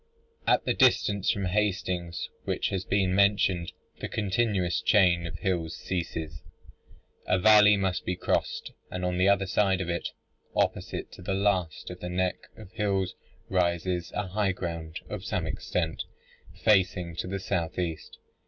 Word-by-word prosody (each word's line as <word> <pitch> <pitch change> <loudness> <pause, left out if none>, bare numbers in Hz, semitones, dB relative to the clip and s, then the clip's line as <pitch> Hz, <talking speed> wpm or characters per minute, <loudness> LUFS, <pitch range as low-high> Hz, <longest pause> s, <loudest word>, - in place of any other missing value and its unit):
At - - +3
the - - +2
distance 100 0 +3
from 100 -4 +1
Hastings 90 -3 -1 0.2
which - - 0
has 95 -2 -2
been 95 -2 +1
mentioned, 100 -3 +3 0.3
the - - -3
continuous 105 -3 0
chain 90 -5 +4
of 85 0 -7
hills 90 -4 -1
ceases. 80 -4 -4 0.9
A 95 - +3
valley 105 +1 +7
must 95 -2 -1
be 90 - -1
crossed, - - -1 0.2
and 90 0 -3
on 90 0 -1
the 95 +2 +5
other 100 -1 +3
side 95 0 +2
of 90 -2 -3
it, 85 - -2 0.5
opposite - - -1
to - - -12
the 95 +2 -2
last 95 -5 0
of 90 - -9
the 90 - -5
neck 90 0 -1
of 105 -4 -12
hills, 95 -3 0 0.3
rises 90 -1 0
a 105 - -1
high 95 +1 0
ground 85 -3 -5
of 105 -3 -6
some 90 -3 -2
extent, 80 +1 -2 0.6
facing 95 -5 +3
to - - -3
the 95 +1 -3
south 85 -3 -2
east. 85 -3 -4
90 Hz, 155 wpm, -28 LUFS, 85-100 Hz, 0.9 s, valley